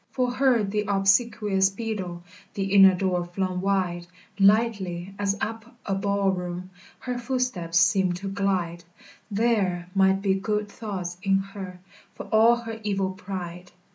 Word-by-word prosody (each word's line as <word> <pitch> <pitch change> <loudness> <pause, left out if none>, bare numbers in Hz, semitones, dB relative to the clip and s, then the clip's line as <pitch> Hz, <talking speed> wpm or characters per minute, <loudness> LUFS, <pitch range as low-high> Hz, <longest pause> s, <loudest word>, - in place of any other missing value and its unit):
For 250 -1 0
her 250 -3 +3
the 210 +1 -1
obsequious 200 0 +2
beadle 195 -5 -5 0.3
The 195 -1 -2
inner 195 -2 +8
door 180 -1 0
flung 180 +1 -3
wide; 185 -3 -1 0.3
Lightly, 195 -3 +2
as 200 0 0
up 225 +2 -5
a 195 - -1
ball 200 0 +1
room, 180 0 -5 0.3
Her 250 -1 -3
footsteps 235 -10 0
seemed 190 -3 +3
to 195 +3 -6
glide, 190 -4 -1 0.5
There 200 -5 0
might 195 0 +3
be 195 -2 +3
good 210 +1 -2
thoughts 185 -6 -5
in 195 -1 +3
her, 195 -2 -7 0.4
For - - -7
all 225 +2 +6
her 230 -2 -7
evil 195 -2 -1
pride. 180 -2 -7
195 Hz, 140 wpm, -25 LUFS, 185-210 Hz, 0.5 s, inner